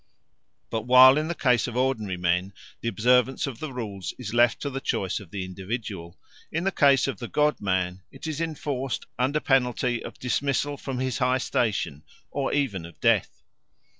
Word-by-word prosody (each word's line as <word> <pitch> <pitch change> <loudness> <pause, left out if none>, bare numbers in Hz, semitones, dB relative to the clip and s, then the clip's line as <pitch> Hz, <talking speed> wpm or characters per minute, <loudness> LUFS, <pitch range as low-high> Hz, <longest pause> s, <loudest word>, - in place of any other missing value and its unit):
But 115 +1 -3
while 130 +1 +9
in 155 +1 0
the 170 - -2
case 125 -6 +2
of 120 0 -5
ordinary 110 -8 0
men 90 +2 0 0.3
the - - -5
observance 125 +3 +2
of 130 -5 -6
the 155 -3 -5
rules 100 -9 -5
is 115 -4 -6
left 120 0 +4
to 140 - -2
the 135 0 -4
choice 95 -5 -1
of 100 -5 -13
the 95 0 -4
individual, 95 -2 -6 0.3
in 165 +2 -1
the 195 - +1
case 140 -6 +4
of 135 - -4
the 120 - -5
god 150 +3 +1
man 95 -1 -1
it - - -11
is 155 0 -3
enforced 145 -5 -3
under 135 +4 +2
penalty 125 -3 +1
of - - -8
dismissal 140 +3 0
from 135 -2 -5
his 130 -1 -2
high 125 0 +2
station, 105 - -1 0.3
or 140 -1 -1
even 125 -12 0
of 85 +1 -12
death. - - +1
125 Hz, 185 wpm, -26 LUFS, 100-135 Hz, 0.3 s, while